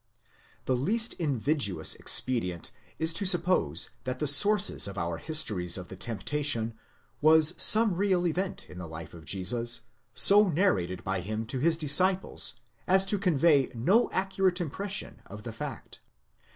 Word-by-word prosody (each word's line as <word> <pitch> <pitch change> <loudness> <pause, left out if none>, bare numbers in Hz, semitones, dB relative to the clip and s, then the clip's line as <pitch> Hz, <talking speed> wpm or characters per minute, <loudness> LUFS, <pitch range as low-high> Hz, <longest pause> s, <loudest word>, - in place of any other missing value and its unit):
The 130 - -1
least 220 - 0
invidious 140 - 0
expedient 90 -10 0 0.3
is 160 +1 +5
to 200 - -1
suppose 175 - 0
that 130 0 -5
the 150 - -4
source 200 - +4
of 100 - -9
our 85 -1 -4
histories 100 - 0
of 90 -1 -10
the - - -10
temptation 115 +3 -2 0.5
was 155 +2 +4
some 220 -2 +6
real 185 -1 -1
event 180 +3 -4
in 90 - -13
the 90 - -8
life 80 -1 -11
of 80 -2 -14
Jesus, 115 +8 0 0.3
so 200 +10 +6
narrated 95 - -2
by 95 0 -3
him 110 +4 -6
to 125 +3 -4
his 160 +4 +1
disciples 180 +5 +1 0.3
as 190 +1 +3
to 200 +1 -1
convey 160 - +1
no 190 - +1
accurate 190 -1 -2
impression 190 +5 -5
of 105 +1 -12
the 115 -1 -8
fact. 115 - -9
145 Hz, 150 wpm, -26 LUFS, -, 0.5 s, some